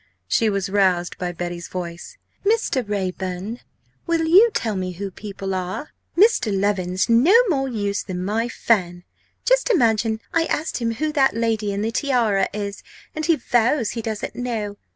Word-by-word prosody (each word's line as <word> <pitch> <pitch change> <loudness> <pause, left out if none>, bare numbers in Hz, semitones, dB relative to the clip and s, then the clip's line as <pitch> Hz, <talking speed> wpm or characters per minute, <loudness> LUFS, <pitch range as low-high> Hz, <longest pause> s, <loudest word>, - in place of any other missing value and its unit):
She 220 - +2
was 200 -2 -1
roused 190 -3 +1
by 180 -1 -2
Betty's 175 0 -5
voice: 175 - -7 0.3
"Mr. 410 - +1
Raeburn! 190 +2 -3 0.5
will 335 -1 +1
you 385 +9 +7
tell 220 - -1
me 185 -1 -3
who 195 +2 -5
people 195 -1 -6
are? 185 - -4 0.3
Mr. 400 - +4
Leven's 190 -2 0
no 245 - +5
more 270 -5 0
use 205 -4 -1
than 180 -1 -5
my 225 +4 -1
fan. 175 -7 0 0.4
Just - - +3
imagine 225 - +2
I 330 -1 +3
asked 315 0 -2
him 230 -2 -1
who 305 +6 -1
that 270 -4 +3
lady 225 -3 0
in 200 +1 -2
the 225 - -1
tiara 230 -7 +1
is 200 -1 -5 0.3
and 310 0 -3
he 335 - +5
vows 240 -1 +1
he 230 - -4
doesn't 220 -1 -4
know! 225 -5 -3
215 Hz, 165 wpm, -22 LUFS, 190-255 Hz, 0.5 s, you